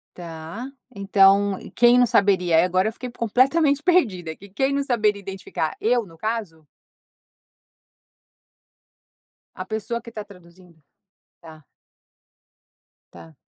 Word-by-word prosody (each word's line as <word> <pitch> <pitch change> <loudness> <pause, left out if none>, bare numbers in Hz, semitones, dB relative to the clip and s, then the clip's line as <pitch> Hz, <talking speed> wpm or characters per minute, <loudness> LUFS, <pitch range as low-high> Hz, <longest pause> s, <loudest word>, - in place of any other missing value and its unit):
Tá, 165 +6 -8 0.3
então, 195 0 +3 0.2
quem 240 0 +5
não 245 - +5
saberia 185 -7 +3
e - - +4
agora 185 +3 +1
eu - - -10
fiquei 250 +1 -8
completamente 275 +6 +2
perdida, 195 - +1
que 200 - -15
quem 270 +8 -1
não 280 0 0
saberia 215 -6 0
identificar, 190 -5 -5
eu 235 +1 +1
no 165 -3 -17
caso? 205 -6 -5 2.9
A 185 - -6
pessoa 220 +3 -4
que 230 - -12
tá 215 -2 -7
traduzindo? 180 -3 -19 0.6
Tá. 155 -2 -14 1.5
Tá. 160 -2 -15
200 Hz, 115 wpm, -22 LUFS, 175-235 Hz, 2.9 s, quem